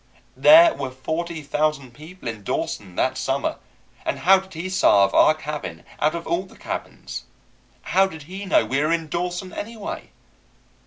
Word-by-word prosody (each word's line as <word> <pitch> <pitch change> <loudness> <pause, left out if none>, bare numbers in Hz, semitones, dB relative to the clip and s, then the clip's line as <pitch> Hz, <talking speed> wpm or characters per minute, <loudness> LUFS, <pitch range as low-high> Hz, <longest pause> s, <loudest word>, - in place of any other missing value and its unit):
There 325 +2 +8
were 135 - -4
forty 160 +5 -4
thousand 145 -3 -1
people 160 0 -11
in 110 -2 -4
Dawson 95 -1 -3
that 130 +6 0
summer, 135 +1 -1 0.5
and - - -2
how 190 +2 +5
did 190 -2 -13
he 165 +4 -4
savvy 100 - +4
our 155 - +6
cabin 150 - -6 0.2
out 155 +2 +2
of 170 - -5
all 170 +3 -1
the - - -18
cabins? - - -6 0.6
How 195 +1 +3
did 160 -5 -10
he 190 +6 -7
know 190 - +3
we 135 - 0
were 155 +2 +1
in 165 -2 -1
Dawson, 180 +2 -3
anyway? 215 -1 -6
160 Hz, 165 wpm, -23 LUFS, 140-185 Hz, 0.6 s, There